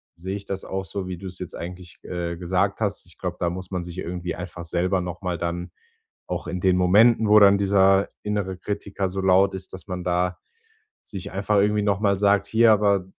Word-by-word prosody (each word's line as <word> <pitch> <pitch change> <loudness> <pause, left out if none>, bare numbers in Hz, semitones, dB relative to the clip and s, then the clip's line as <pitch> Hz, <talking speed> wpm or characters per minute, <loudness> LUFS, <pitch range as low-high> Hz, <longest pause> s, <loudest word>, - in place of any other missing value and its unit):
sehe 95 +3 -5
ich 100 0 -7
das 95 -1 -5
auch 95 0 -4
so, 95 0 -5
wie 90 -1 -5
du 95 +2 -8
es 90 0 -8
jetzt 90 -1 -7
eigentlich, 90 0 -8
äh, 85 -1 -4
gesagt 95 +3 0
hast. 100 -2 -2
Ich 90 - -20
glaube, 90 -1 -4
da 85 - +1
muss 90 +2 -7
man 90 -2 -2
sich 85 0 -9
irgendwie 90 0 -4
einfach 90 -1 -7
selber 90 +2 0
noch 90 -1 -6
mal 90 -2 -1
dann 85 +1 -3 0.6
auch - - -4
in 90 - -3
den 90 0 +3
Momenten, 110 +5 +5
wo 105 0 +8
dann 100 -1 +7
dieser 95 0 +3
innere 100 -3 -2
Kritiker 100 -1 -3
so 95 +1 -5
laut 95 +1 +4
ist, 95 0 -8
dass 95 -3 -10
man 90 -1 -4
da, 90 +1 0 0.7
sich 95 -4 -8
einfach 100 +2 0
irgendwie 105 +1 +3
nochmal 100 -1 +1
sagt: 100 -1 +3
„Hier, 115 +1 +5
aber 100 -3 +2
95 Hz, 215 wpm, -24 LUFS, 90-100 Hz, 0.7 s, wo